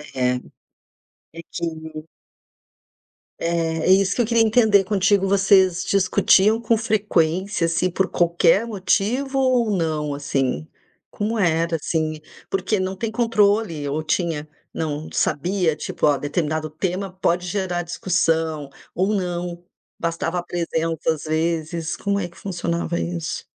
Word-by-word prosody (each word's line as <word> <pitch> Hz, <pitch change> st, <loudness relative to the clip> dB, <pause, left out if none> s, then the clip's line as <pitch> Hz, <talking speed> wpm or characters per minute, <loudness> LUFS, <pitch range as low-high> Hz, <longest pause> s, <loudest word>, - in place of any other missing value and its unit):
É. 125 Hz, -1 st, +2 dB, 1.0 s
É 165 Hz, -, -8 dB
que 170 Hz, -, -4 dB
o 160 Hz, -1 st, -6 dB, 1.3 s
Eh, 165 Hz, -1 st, -1 dB
é 185 Hz, -, +4 dB
isso 195 Hz, 0 st, +3 dB
que 245 Hz, -, +2 dB
eu -, -, -1 dB
queria 230 Hz, +1 st, +3 dB
entender 215 Hz, -3 st, +4 dB
contigo: 200 Hz, 0 st, +2 dB
vocês 190 Hz, -2 st, +4 dB
discutiam 200 Hz, +2 st, +4 dB
com 230 Hz, 0 st, +2 dB
frequência, 200 Hz, -5 st, +1 dB
assim, 175 Hz, +2 st, +1 dB
por 190 Hz, +2 st, 0 dB
qualquer 175 Hz, +4 st, +3 dB
motivo 230 Hz, +6 st, 0 dB
ou 255 Hz, -3 st, +2 dB
não, 155 Hz, -3 st, -1 dB
assim, 135 Hz, -, -1 dB, 0.4 s
como 220 Hz, +2 st, -2 dB
era, 170 Hz, -3 st, +1 dB
assim? 155 Hz, 0 st, -2 dB, 0.3 s
Porque 195 Hz, +1 st, 0 dB
não 185 Hz, +1 st, -2 dB
tem 220 Hz, +3 st, -3 dB
controle 210 Hz, -9 st, +1 dB
ou 150 Hz, +3 st, -1 dB
tinha 155 Hz, -2 st, -1 dB, 0.2 s
não 155 Hz, -1 st, -3 dB
sabia, 170 Hz, +2 st, 0 dB
tipo, 155 Hz, -, -2 dB
"Ó, 145 Hz, -2 st, +3 dB
determinado 155 Hz, +1 st, -2 dB
tema 185 Hz, +5 st, -3 dB
pode 180 Hz, -1 st, 0 dB
gerar 180 Hz, -2 st, -2 dB
discussão" 165 Hz, -4 st, 0 dB, 0.3 s
ou 190 Hz, +4 st, +1 dB
não, 175 Hz, -2 st, -3 dB, 0.4 s
bastava 170 Hz, +1 st, -2 dB
a -, -, -5 dB
presença, 165 Hz, -2 st, -1 dB
às 155 Hz, -, -8 dB
vezes, 160 Hz, +1 st, -1 dB
como 200 Hz, 0 st, -1 dB
é 175 Hz, -, -2 dB
que 170 Hz, -, -19 dB
funcionava 170 Hz, -2 st, -2 dB
isso? 170 Hz, -1 st, -4 dB
175 Hz, 135 wpm, -22 LUFS, 160-200 Hz, 1.3 s, é